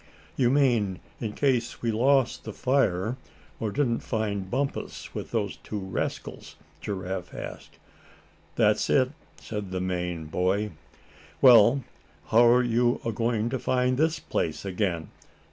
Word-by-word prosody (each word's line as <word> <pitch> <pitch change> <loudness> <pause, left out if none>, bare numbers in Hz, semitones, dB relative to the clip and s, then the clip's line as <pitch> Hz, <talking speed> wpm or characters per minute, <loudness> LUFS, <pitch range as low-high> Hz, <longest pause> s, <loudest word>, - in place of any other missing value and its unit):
"You 125 -2 +3
mean 120 -9 +2 0.2
in 110 -3 -3
case 125 -4 0
we 115 - +1
lost 125 +2 +2
the - - -6
fire, 125 -4 +1 0.4
or 110 - -1
didn't 120 0 0
find 100 -4 -2
Bumpus 135 +4 -3
with - - -5
those - - -2
two 105 - -6
rascals?" 95 -2 -5 0.3
Giraffe 95 -2 -4
asked. - - -8 0.8
"That's - - +2
it," 130 0 +3 0.3
said 105 -3 -5
the 95 0 -3
Maine 90 -3 -2
boy. 95 +6 0 0.7
"Well, 125 +1 +7 0.5
how're 120 +2 +6
you 120 0 +2
agoin' 115 0 0
to 130 - -1
find 125 +1 +1
this 160 +1 +2
place - - -3
again?" 90 -4 -2
115 Hz, 130 wpm, -27 LUFS, 95-125 Hz, 0.8 s, Well